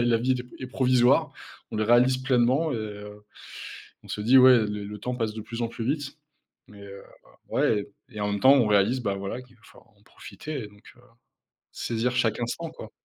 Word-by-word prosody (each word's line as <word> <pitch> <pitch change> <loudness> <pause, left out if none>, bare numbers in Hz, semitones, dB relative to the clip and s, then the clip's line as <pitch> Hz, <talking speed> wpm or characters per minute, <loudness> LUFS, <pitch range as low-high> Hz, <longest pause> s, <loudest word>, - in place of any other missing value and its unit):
la 120 - +2
la 120 -1 +3
vie 125 +3 -1
est - - -5 0.2
est - - -4
d - - -16
provisoire, 125 -2 +3 0.4
on - - -3
le 110 - 0
réalise 120 +3 +4
pleinement 130 +4 +1
et 105 -2 -5 1.0
on - - -15
se 105 - -4
dit: 125 +5 +5
«Ouais, 130 -1 +8
le 105 0 -6
temps 125 +4 -4
passe 110 -3 -2
de 110 - -6
plus 115 +2 -6
en 115 - -1
plus 115 0 -6
vite». 140 +2 -3 0.5
Mais 100 -1 -14
heu, 100 0 -11 0.5
ouais 105 -2 0 0.2
et 105 -3 -8
en 105 - -1
même 100 - -1
temps, 130 - +7
on 120 -6 +3
réalise 105 +5 +2
bah 100 -4 -2
voilà 100 +6 -5
qu'il 125 -1 -21
va 115 - -30
falloir 115 - -19
en 100 - -28
profiter 135 +7 -8
et - - -9
donc 105 +1 -21
heu, - - -20 0.7
saisir 120 +1 -2
chaque 115 -3 +1
instant, 160 +8 -4
quoi. 165 - -11
120 Hz, 215 wpm, -26 LUFS, 105-130 Hz, 1.0 s, Ouais